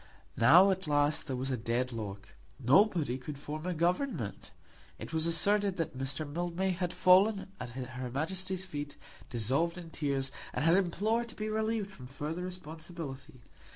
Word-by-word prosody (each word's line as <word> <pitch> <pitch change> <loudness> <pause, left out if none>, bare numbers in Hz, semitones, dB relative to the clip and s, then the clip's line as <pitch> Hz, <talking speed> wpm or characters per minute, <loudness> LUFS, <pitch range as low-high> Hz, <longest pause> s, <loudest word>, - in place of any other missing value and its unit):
Now 180 +12 +7
at 190 -1 -2
last 145 +1 +2
there 130 - -2
was 130 +2 -2
a 130 - 0
dead 120 +3 -1
lock. 105 -2 -6 0.3
Nobody 140 - +3
could 140 +2 -7
form 155 +4 -6
a 180 - 0
government. 170 - -1 0.5
It - - -8
was 160 0 +2
asserted 200 +4 +3
that 165 -5 -2
Mr. 135 +4 -3
Mildmay 175 +5 -1
had 180 -1 -2
fallen 190 +2 +4
at 125 - -5
her 125 0 -5
Majesty's 185 +7 -2
feet 145 -5 -6 0.3
dissolved 135 - +1
in 170 -2 -9
tears, 140 -3 0 0.2
and - - 0
had 165 +1 +6
implored 210 +6 +1
to - - -8
be 215 0 -3
relieved 220 -1 -1
from 125 -9 -11
further 150 +6 -4
responsibility. 160 -7 -8
160 Hz, 160 wpm, -32 LUFS, 135-185 Hz, 0.5 s, Now